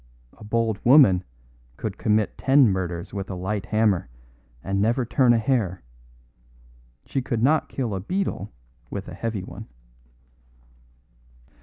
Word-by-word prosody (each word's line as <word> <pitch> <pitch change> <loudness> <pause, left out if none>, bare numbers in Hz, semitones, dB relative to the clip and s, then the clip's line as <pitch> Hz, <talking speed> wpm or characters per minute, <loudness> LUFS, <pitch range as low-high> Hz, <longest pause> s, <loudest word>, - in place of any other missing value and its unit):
A - - -14
bold 110 -1 -1
woman 120 -9 +6 0.5
could 105 -2 -5
commit 105 -1 +1
ten 135 -1 +4
murders 90 -3 -3
with 100 -1 -5
a 95 - -4
light 100 +3 -3
hammer 105 -7 +1 0.5
and 100 0 -1
never 120 +4 +1
turn 125 +1 +3
a 120 - +4
hair. 110 - 0 1.2
She 135 - -2
could 120 -3 -2
not 155 +3 +2
kill 120 -6 -3
a 95 - -2
beetle 145 - -3 0.4
with 100 -2 -6
a 90 - -8
heavy 105 0 -4
one." - - -10
105 Hz, 135 wpm, -24 LUFS, 95-120 Hz, 1.2 s, woman